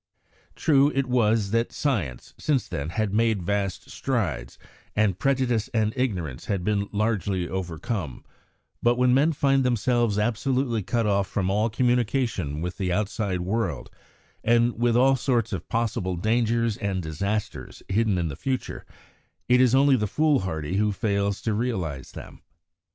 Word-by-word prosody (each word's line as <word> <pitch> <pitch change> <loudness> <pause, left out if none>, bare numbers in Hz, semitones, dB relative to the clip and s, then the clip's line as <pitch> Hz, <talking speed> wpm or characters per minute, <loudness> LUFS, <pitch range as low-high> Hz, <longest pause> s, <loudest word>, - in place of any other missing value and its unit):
True 145 -1 +3
it 135 0 +1
was 110 -5 +2
that 115 +1 +1
science, 95 - -2
since 135 -7 0
then, 70 -5 -4
had 105 +2 -1
made 110 -3 +2
vast 100 0 -2
strides, 100 - -2 0.4
and 100 -4 +1
prejudice 130 -5 +1
and 110 -1 +1
ignorance 90 - -2
had 95 -3 -2
been 100 0 0
largely 100 -4 0
overcome; 90 - -4 0.6
but 120 +1 +3
when 125 0 +3
men 145 +5 +4
find 135 -2 +2
themselves 120 -3 +1
absolutely 120 +2 0
cut 115 +4 -1
off 100 -2 +1
from 95 -2 -1
all 105 +3 +1
communication 115 - 0
with 90 +1 -5
the 95 -2 -1
outside 100 -1 -1
world, 95 - -2 0.5
and 120 0 +3
with 120 0 +3
all 135 +2 +5
sorts 120 -4 0
of 95 - -5
possible 110 -5 -1
dangers 115 +3 +1
and 95 -3 -2
disasters 100 +7 -4
hidden 105 0 +1
in 85 -2 0
the 70 - -5
future, 130 - -4 0.6
it 125 +1 +5
is 130 0 +4
only 140 0 +5
the 105 -4 0
fool 150 +5 +2
hardy 85 -1 -3
who 105 0 +2
fails 100 -1 -1
to 110 - 0
realise 95 - -3
them. - - -10
110 Hz, 150 wpm, -25 LUFS, 95-120 Hz, 0.6 s, all